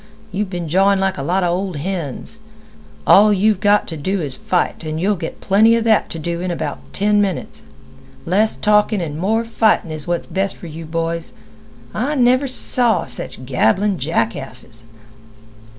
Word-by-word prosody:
You've 195 +1 -2
been 175 -3 -4
jawin' 195 +4 +3
like 190 -4 -1
a - - -2
lot 180 +7 0
'a - - +2
old 180 +1 -2
hens. 170 - -5 0.7
All 210 +2 +6
you've 205 0 +2
got 205 0 +3
t' 165 - -6
do 190 +6 -2
is 145 -6 -2
to - - -14
fight, 180 -2 -1
an' 155 0 -4
you'll 195 +5 +1
get 165 -3 -7
plenty 220 +4 +4
'a 230 - +1
that 220 -2 +2
t' - - -6
do 170 +2 -4
in 185 - -3
about 160 -4 -4
ten 205 +1 +2
minutes. 195 -3 -3 0.6
Less 205 +6 +2
talkin' 210 0 +2
an' 155 -3 -4
more 220 +5 0
fightin' 220 -7 +1
is 155 0 -5
what's 175 0 -1
best 195 0 -2
for - - -11
you 165 0 -8
boys. 165 +1 -3 0.6
I 290 +4 -1
never 255 +1 +3
saw 250 -2 +2
sech 130 0 0
gabbling 170 - +1
jackasses." 125 -4 -3
185 Hz, 175 wpm, -19 LUFS, 160-210 Hz, 0.7 s, All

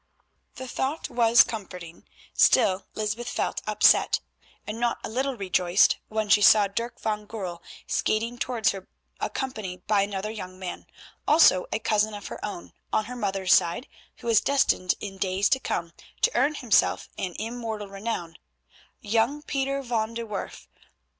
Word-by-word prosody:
The 260 - -7
thought 270 +5 -3
was 235 0 +6
comforting, 180 - -8 0.3
still 185 +1 +4
Lysbeth 215 +3 -2
felt - - -2
upset, - - +4 0.5
and 215 +2 -5
not 240 -1 0
a - - -4
little 260 +3 -2
rejoiced 185 -1 +3
when 215 0 -2
she 205 +1 +5
saw 205 0 +7
Dirk 230 +5 -4
van 210 -1 -3
Goorl 185 -6 -6 0.2
skating 230 +3 -1
towards 240 -4 +1
her 195 -2 -9 0.3
accompanied 210 -9 -4
by 205 -2 +3
another 200 +1 -3
young 185 -4 -8
man, 185 -1 -7 0.4
also 295 - +5
a - - +1
cousin 215 -1 +1
of 205 - -8
her - - -8
own 205 -4 -6 0.2
on 215 - +1
her 250 +3 -7
mother's 195 -5 +1
side 170 +10 +2 0.3
who - - -15
was 230 -2 +4
destined 270 -9 +2
in 195 -2 -7
days 190 +1 +1
to 265 - +3
come 170 -9 -3 0.3
to - - +5
earn 280 +5 +2
himself 245 -6 +2
an 180 -2 -3
immortal 225 -2 -5
renown—young 220 - -4
Pieter 275 -1 -2
van 230 -2 -2
de 235 0 -4
Werff. 210 -3 -6
215 Hz, 155 wpm, -26 LUFS, 195-235 Hz, 0.5 s, saw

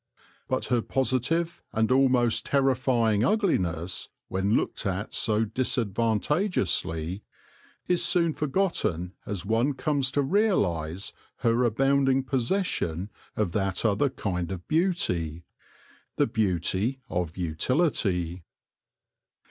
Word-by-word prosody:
But 130 - -1
her 120 - +3
positive 135 +8 0
and 110 +2 +1
almost 130 -3 +3
terrifying 125 -6 +2
ugliness, 95 - 0 0.2
when 95 +3 +1
looked - - -1
at 95 +2 -3
so 110 0 +2
disadvantageously, 110 - 0 0.7
is 180 -1 +2
soon 170 -3 +3
forgotten 135 - -1
as 100 -3 -4
one 115 +7 +1
comes 140 -1 0
to 145 - +2
realise 100 - 0 0.3
her 115 +2 +3
abounding 135 +3 +2
possession 125 - -1 0.2
of 105 -5 0
that 95 +1 -1
other 110 +6 +2
kind 90 -8 -3
of 90 -2 -6
beauty 90 - 0 0.4
— - - -30
the - - +4
beauty 100 - 0
of 85 -1 -3
utility. 90 - 0
115 Hz, 105 wpm, -27 LUFS, 95-135 Hz, 0.7 s, the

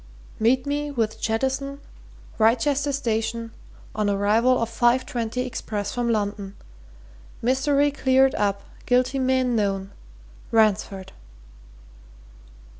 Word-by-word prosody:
"Meet 250 +4 +2
me 290 +1 -2
with 230 -6 -2
Jettison 265 +5 -1 0.6
Wrychester 265 +6 +2
Station 230 -3 -2 0.4
on 210 -1 0
arrival 215 +5 +3
of 230 - 0
five 240 +2 +2
twenty 235 +1 -3
express 225 -4 -4
from 245 -1 -1
London 205 -2 -2 0.8
mystery 280 +4 +2
cleared 265 -1 +3
up 200 -1 -1 0.2
guilty 255 +2 +2
men 260 -1 +1
known 195 -2 -1 0.6
Ransford." 205 -3 +1
235 Hz, 100 wpm, -24 LUFS, 215-260 Hz, 0.8 s, arrival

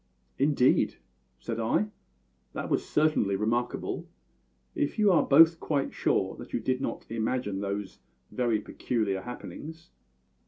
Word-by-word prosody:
"Indeed!" 140 -2 +3 0.4
said 115 - -4
I. 160 - +1 0.6
"That - - -4
was - - 0
certainly 150 -10 +2
remarkable 120 +4 -2 0.6
if 145 - -1
you 210 -2 +5
are 165 -4 +5
both 165 +4 +6
quite 140 -3 -1
sure - - 0 0.2
you - - -1
did 130 +3 -1
not - - -4
imagine 110 -3 -1
those 100 -1 -4 0.3
very 120 -4 +1
peculiar 105 -3 -2
happenings." 160 - -9
125 Hz, 120 wpm, -28 LUFS, 110-150 Hz, 0.6 s, both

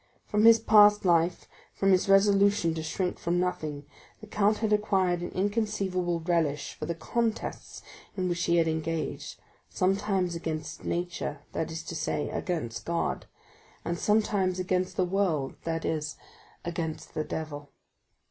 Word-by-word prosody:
From 210 +1 +2
his 230 0 +9
past 210 -2 +6
life, 170 0 +2 0.3
from 195 0 +2
his 185 +1 +3
resolution 200 -3 +4
to 160 - -4
shrink 180 +3 -2
from 175 +1 0
nothing, 155 -5 -2 0.3
the - - -10
count 210 0 +2
had 220 -2 0
acquired 190 -4 +1
an 175 - -4
inconceivable 195 -4 -1
relish 160 -4 0
for - - -6
the 170 - -2
contests 225 +7 -3 0.3
in 185 -1 0
which 175 -1 -1
he 170 - +2
had 165 -1 +3
engaged, 160 0 -3 0.3
sometimes 190 -1 0
against 155 -2 -5
nature, 175 -4 -3
that 160 - -2
is 160 0 -5
to 165 - -7
say, 150 -2 -2
against 155 -11 -3
God, 170 0 -2 0.6
and 170 - -1
sometimes 205 -3 +1
against 185 0 -1
the 185 - +3
world, 175 -7 0
that 165 -1 -2
is, 155 -1 -2 0.5
against 170 -2 -4
the 155 - -1
devil. 145 -2 -6
175 Hz, 150 wpm, -28 LUFS, 160-200 Hz, 0.6 s, his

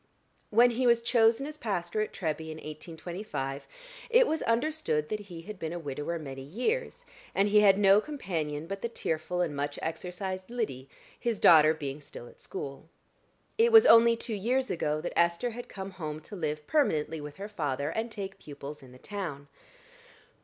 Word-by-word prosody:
When 240 +3 +6
he 250 +2 +1
was 235 -1 +4
chosen 235 +2 +3
as 305 +1 -7
pastor 195 -2 -2
at 215 - -2
Treby 160 -2 -3
in 155 - -6
1825, 155 -2 -6 0.4
it - - +6
was 320 -5 -1
understood 230 - 0
that 215 - -2
he 180 -5 -9
had 205 +1 -8
been 160 +1 -4
a - - -3
widower 150 +1 -4
many 135 -4 -7
years, 250 - -2 0.3
and 195 +1 +3
he 210 +1 +6
had 200 -2 +6
no 200 0 +6
companion 165 - -4
but 195 +3 -5
the 235 - -2
tearful 180 -4 -2
and 160 -5 -1
much 145 +1 -3
exercised 185 +3 -4
Lyddy, 175 - -3 0.3
his 235 -3 -1
daughter 155 -1 +7
being 145 -1 -5
still 120 -4 -10
at - - -16
school. 145 -2 -7 0.7
It 465 +1 +5
was 445 +1 +9
only 230 - +7
two 230 0 -4
years 245 +6 0
ago 155 -2 -1
that 175 - -4
Esther 170 +8 +2
had 245 +2 -8
come 195 -1 -6
home 155 -4 -5
to 205 - -10
live 155 -4 -3
permanently 160 - +1
with 145 0 -8
her 200 +1 -5
father, 145 -8 -2
and 225 +2 -2
take 195 -2 -6
pupils 145 0 -9
in 130 -2 -14
the - - -13
town. 155 -6 -6
180 Hz, 180 wpm, -29 LUFS, 150-225 Hz, 0.7 s, was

